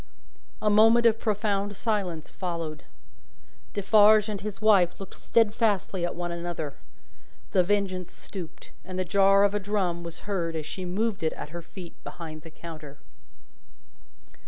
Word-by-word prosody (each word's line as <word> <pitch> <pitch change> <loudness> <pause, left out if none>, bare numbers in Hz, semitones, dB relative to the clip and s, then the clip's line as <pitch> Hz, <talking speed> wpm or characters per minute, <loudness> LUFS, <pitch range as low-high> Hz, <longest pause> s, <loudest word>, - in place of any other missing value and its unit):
A 210 - +4
moment 225 +3 +6
of 225 -1 +5
profound 205 -2 -1
silence 195 -9 -2
followed. 165 -4 -5 0.9
Defarge 210 +1 +5
and 205 -2 -4
his 210 -1 -5
wife 200 -5 +4
looked 195 - -8
steadfastly 210 -4 +1
at 175 - -1
one 175 0 -3
another. 170 -4 -4 0.8
The 185 - +4
Vengeance 185 -2 -1
stooped, 180 -5 -9
and 185 -1 -7
the 185 - 0
jar 195 +2 +5
of 200 0 +3
a 205 - +1
drum 190 -4 -1
was 170 0 -7
heard 175 -5 -2
as 155 -2 -3
she 185 +4 -5
moved 205 +4 -1
it 160 -1 0
at - - -7
her 170 +2 -7
feet 170 +1 -10
behind 155 -2 -8
the 165 - -11
counter. 155 -3 -10
190 Hz, 150 wpm, -27 LUFS, 170-205 Hz, 0.9 s, moment